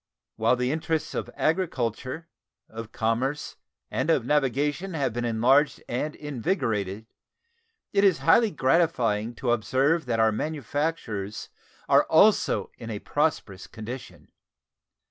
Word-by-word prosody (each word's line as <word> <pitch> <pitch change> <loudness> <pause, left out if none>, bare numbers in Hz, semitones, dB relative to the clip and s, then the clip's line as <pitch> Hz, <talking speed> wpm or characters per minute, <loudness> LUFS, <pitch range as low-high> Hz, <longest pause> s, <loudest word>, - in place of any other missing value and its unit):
Whilst 115 +3 +2
the 125 +1 0
interests 160 0 -2
of - - -3
agriculture, 155 - -1 0.4
of 110 0 -8
commerce, 125 +6 -2 0.3
and 130 +5 -1
of 135 -8 +2
navigation 150 +6 0
have 135 -6 -1
been 120 +1 -2
enlarged 125 +6 +2
and 150 +5 -3
invigorated, 115 - -2 0.9
it 200 0 +3
is 190 -5 +5
highly 220 +8 +4
gratifying 130 - +1
to 120 +1 -1
observe 135 +7 +1
that 115 -2 0
our 110 0 +4
manufactures 140 -6 -3 0.4
are - - +5
also - - +3
in 115 - -7
a 105 - -3
prosperous 110 -8 -2
condition. 120 +4 -9
130 Hz, 120 wpm, -26 LUFS, 115-155 Hz, 0.9 s, is